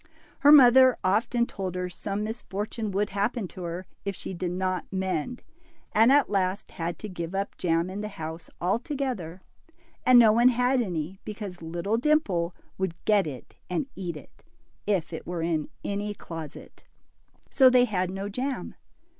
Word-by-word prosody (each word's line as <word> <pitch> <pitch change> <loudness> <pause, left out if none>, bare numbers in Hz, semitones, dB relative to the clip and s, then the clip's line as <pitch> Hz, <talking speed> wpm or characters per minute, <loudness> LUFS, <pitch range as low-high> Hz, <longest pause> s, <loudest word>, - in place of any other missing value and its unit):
Her 290 - +7
mother 260 -2 +8
often 225 +5 +2
told 190 -5 -5
her 180 0 -2
some 195 +3 -4
misfortune 215 0 -4
would 205 +2 -1
happen 205 +2 -1
to 185 - -10
her 175 +1 -5 0.2
if 200 -1 -3
she - - -7
did 180 0 -3
not 185 0 -2
mend, 190 +4 -2 0.5
and 225 +4 +5
at 285 0 +5
last 195 0 -1
had 170 0 -4
to 215 - -7
give 175 -2 -5
up 200 +1 -2
jam 165 0 +1
in 190 +2 -5
the 210 - -3
house 160 -4 -7
altogether, 210 - -2 0.6
and 255 -1 +7
no 230 -3 +8
one 240 +3 +5
had 250 +1 +2
any, 180 -3 -3
because 205 -4 -7
little 175 +7 -2
Dimple 215 - +1 0.2
would 190 -3 -1
get 205 -5 +3
it 130 -5 -9
and 180 +10 -1
eat 175 -4 -4
it, 145 - -16 0.4
if 180 -5 0
it 160 - -7
were 175 -2 -3
in 160 -3 -1 0.2
any 205 +1 -2
closet. 165 -5 -9 0.7
So 265 -2 +7
they 250 -1 +5
had 185 -5 -1
no 195 +2 -4
jam. 255 +6 -3
195 Hz, 165 wpm, -27 LUFS, 175-230 Hz, 0.7 s, mother